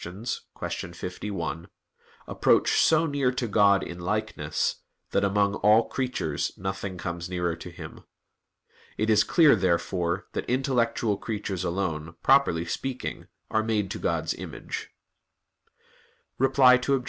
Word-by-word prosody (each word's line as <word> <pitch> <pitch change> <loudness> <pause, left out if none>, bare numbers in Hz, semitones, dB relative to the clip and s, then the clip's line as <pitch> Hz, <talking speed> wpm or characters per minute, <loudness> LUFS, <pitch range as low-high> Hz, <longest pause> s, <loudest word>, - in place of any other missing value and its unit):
51) 90 -1 -5 0.6
"approach - - +2
so 160 0 +4
near 140 -4 +1
to 125 -1 -2
God 100 -2 +4
in 85 0 -7
likeness, 105 -4 -1 0.3
that - - +1
among 100 0 +2
all 110 +3 +4
creatures 125 - -2
nothing 95 0 -4
comes 85 0 -5
nearer 90 -2 -1
to - - -9
Him." - - -10 0.9
It 110 +1 +1
is 105 -1 +5
clear, 160 -7 +5
therefore, 90 -1 0
that - - -4
intellectual 120 -4 +1
creatures 100 -5 -4
alone, 85 -3 -3
properly 135 -12 +4
speaking, 130 +9 -4 0.2
are 110 - +2
made 110 -3 -1
to - - -4
God's - - -1
image. - - -7 1.5
Reply 130 -1 +5
Obj. 140 -1 +3
100 Hz, 120 wpm, -26 LUFS, 90-125 Hz, 1.5 s, is